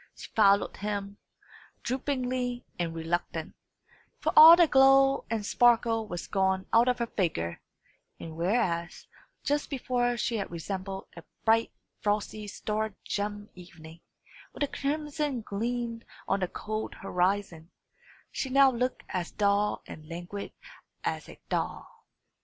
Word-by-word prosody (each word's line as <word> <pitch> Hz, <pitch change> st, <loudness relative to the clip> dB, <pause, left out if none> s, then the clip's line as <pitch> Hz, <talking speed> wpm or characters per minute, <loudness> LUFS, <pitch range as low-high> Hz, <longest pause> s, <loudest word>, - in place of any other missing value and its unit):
She -, -, -11 dB
followed 200 Hz, -2 st, +3 dB
him, 200 Hz, -1 st, -4 dB, 0.6 s
droopingly 250 Hz, -1 st, -2 dB
and 165 Hz, -1 st, -2 dB
reluctant; 165 Hz, +2 st, -3 dB, 0.6 s
for -, -, -1 dB
all 320 Hz, +2 st, +12 dB
the 345 Hz, 0 st, +6 dB
glow 270 Hz, -1 st, +5 dB
and 220 Hz, -2 st, -2 dB
sparkle 230 Hz, -1 st, +3 dB
was 175 Hz, -3 st, -5 dB
gone 190 Hz, -1 st, 0 dB
out 230 Hz, +2 st, +6 dB
of 250 Hz, 0 st, +2 dB
her 235 Hz, -, -1 dB
figure; 160 Hz, -, -2 dB, 0.6 s
and 160 Hz, -1 st, -8 dB
whereas 170 Hz, -1 st, -1 dB, 0.4 s
just 290 Hz, 0 st, 0 dB
before 245 Hz, -3 st, 0 dB
she 230 Hz, 0 st, -1 dB
had 200 Hz, -, -3 dB
resembled 190 Hz, +3 st, -5 dB
a 170 Hz, -, -10 dB, 0.2 s
bright 225 Hz, +1 st, +3 dB, 0.3 s
frosty, 210 Hz, 0 st, -2 dB
star 215 Hz, 0 st, -3 dB
gemmed 205 Hz, 0 st, -3 dB
evening, 170 Hz, -2 st, -13 dB, 0.5 s
with -, -, -2 dB
a -, -, +1 dB
crimson 295 Hz, -2 st, -2 dB
gleam 230 Hz, +2 st, -3 dB, 0.3 s
on 195 Hz, -, +1 dB
the 185 Hz, -, 0 dB
cold 215 Hz, +4 st, -5 dB
horizon, 180 Hz, -3 st, -1 dB, 0.6 s
she 265 Hz, -, -3 dB
now 270 Hz, 0 st, +6 dB
looked 250 Hz, +1 st, -2 dB
as 180 Hz, -2 st, -3 dB
dull 205 Hz, 0 st, +1 dB
and 155 Hz, 0 st, -11 dB
languid 175 Hz, +4 st, -6 dB, 0.5 s
as -, -, -3 dB
a -, -, -10 dB, 0.2 s
thaw. -, -, -2 dB
210 Hz, 130 wpm, -29 LUFS, 190-245 Hz, 0.6 s, all